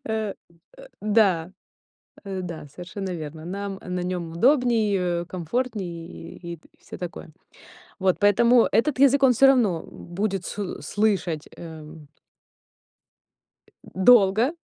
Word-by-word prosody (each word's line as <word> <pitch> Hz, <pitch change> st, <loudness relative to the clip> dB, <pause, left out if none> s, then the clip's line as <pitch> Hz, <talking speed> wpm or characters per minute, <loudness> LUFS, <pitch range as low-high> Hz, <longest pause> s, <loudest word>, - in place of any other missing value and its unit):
э, 220 Hz, -2 st, -2 dB, 0.4 s
э. -, -, -12 dB
Да, 200 Hz, -5 st, +2 dB, 0.7 s
э, 195 Hz, -2 st, -4 dB
да, 170 Hz, -4 st, -7 dB
совершенно 180 Hz, +5 st, -7 dB
верно. 155 Hz, -1 st, -7 dB
Нам 195 Hz, +2 st, -5 dB
на 180 Hz, 0 st, -4 dB
нём 180 Hz, -2 st, -4 dB
удобнее, 205 Hz, -, +2 dB
комфортнее 180 Hz, -3 st, -5 dB
и, 170 Hz, -1 st, -7 dB
и -, -, -24 dB, 0.2 s
всё -, -, -10 dB
такое. 175 Hz, -2 st, -7 dB, 0.7 s
Вот, 185 Hz, -1 st, +1 dB
поэтому 235 Hz, +4 st, +5 dB
этот 255 Hz, +5 st, +1 dB
язык, 280 Hz, 0 st, +5 dB
он 260 Hz, -, +6 dB
всё 270 Hz, +3 st, +6 dB
равно 220 Hz, -11 st, +3 dB
будет 195 Hz, +1 st, -4 dB
сл 205 Hz, -3 st, -5 dB
слышать, 195 Hz, -7 st, -1 dB
э 160 Hz, -2 st, -9 dB, 2.1 s
долго. 220 Hz, -, +5 dB
195 Hz, 115 wpm, -24 LUFS, 175-225 Hz, 2.1 s, он